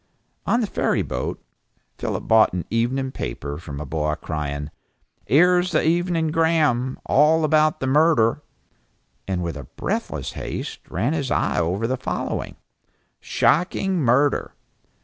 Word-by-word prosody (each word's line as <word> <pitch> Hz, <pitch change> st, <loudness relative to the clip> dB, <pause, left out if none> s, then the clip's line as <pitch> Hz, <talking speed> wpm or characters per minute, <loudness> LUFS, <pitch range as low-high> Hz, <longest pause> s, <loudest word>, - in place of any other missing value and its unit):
On 240 Hz, -, +2 dB
the -, -, +1 dB
ferry -, -, 0 dB
boat 60 Hz, -, -4 dB, 0.6 s
Philip -, -, -3 dB
bought 110 Hz, -4 st, +5 dB
an 90 Hz, -2 st, -3 dB
evening 130 Hz, +4 st, 0 dB
paper 70 Hz, -, -5 dB
from 75 Hz, -4 st, -8 dB
a 75 Hz, -, -5 dB
boy 75 Hz, +1 st, -1 dB
crying 75 Hz, -1 st, -4 dB, 0.6 s
"'Ere's 180 Hz, +3 st, +4 dB
the -, -, +3 dB
Evening 170 Hz, -1 st, +1 dB
Gram, 155 Hz, -6 st, +2 dB
all 155 Hz, +3 st, +4 dB
about 155 Hz, 0 st, +3 dB
the -, -, 0 dB
murder," 130 Hz, -5 st, +3 dB, 0.9 s
and 90 Hz, -2 st, -1 dB
with 80 Hz, -4 st, -4 dB
breathless -, -, -3 dB
haste -, -, -6 dB
ran 115 Hz, -, 0 dB
his 140 Hz, -5 st, -2 dB
eyes -, -, +1 dB
over 90 Hz, +6 st, 0 dB
the 130 Hz, +3 st, -1 dB
following: 130 Hz, -, -3 dB, 0.6 s
SHOCKING 185 Hz, +1 st, +1 dB
MURDER!!! 135 Hz, +4 st, +2 dB
130 Hz, 130 wpm, -23 LUFS, -, 0.9 s, bought